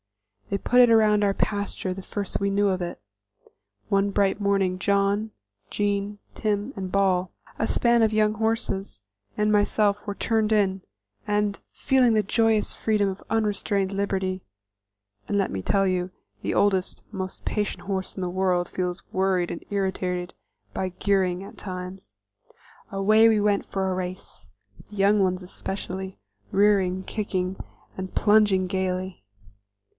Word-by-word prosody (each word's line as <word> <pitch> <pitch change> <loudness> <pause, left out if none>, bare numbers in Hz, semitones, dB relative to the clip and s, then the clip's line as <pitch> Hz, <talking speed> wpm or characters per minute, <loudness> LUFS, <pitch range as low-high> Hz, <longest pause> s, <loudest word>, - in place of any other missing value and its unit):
They 200 - 0
put 245 +5 +4
it 245 - +7
around 215 -2 +4
our 200 -1 +3
pasture 200 -2 -2
the 195 - -7
first 200 +1 -3
we 200 - +1
knew 200 +1 +2
of 185 -1 -1
it. 175 0 -4 0.9
One 200 0 +2
bright 200 +1 +1
morning 195 -2 +1
John, 200 +2 +1 0.4
Jean, 205 0 -1 0.2
Tim 210 +3 -1
and 190 -2 -5
Ball 185 -2 +2 0.3
a - - +1
span 235 -1 +3
of 220 -1 +3
young 215 0 +2
horses 220 - -2 0.4
and 210 0 +2
myself 205 0 +2
were 205 - -4
turned 220 0 0
in, 195 -3 +2 0.5
and, 210 -1 0
feeling 255 -3 +3
the 215 - +3
joyous 220 0 +2
freedom 210 -2 +1
of 190 0 -5
unrestrained 205 -3 0
liberty 190 -1 -1 0.9
(and, 205 - 0
let 195 - +1
me 95 - -3
tell 195 - +2
you, 180 -1 0 0.3
the - - -2
oldest, 190 -2 +1
most 190 -2 -6
patient 210 -2 -2
horse 190 -1 -3
in - - -3
the 180 - -1
world 180 -1 +1
feels 180 -1 -3
worried 185 -2 +1
and 170 - -6
irritated 185 -2 -2 0.4
by 190 - -2
gearing, 190 -2 +1
at 195 - -12
times), 185 0 -7 0.8
away 215 +3 +5
we 220 -1 +3
went 205 -1 +1
for 190 -1 -2
a - - 0
race, 185 - -6 0.4
the 210 - -11
young 200 +1 +4
ones 185 -1 0
especially, 190 +1 -5 0.3
rearing, 195 -2 +3
kicking 190 -3 -2 0.4
and 190 0 -6
plunging 205 -3 +4
gaily. 185 0 -2
195 Hz, 150 wpm, -25 LUFS, 185-210 Hz, 0.9 s, it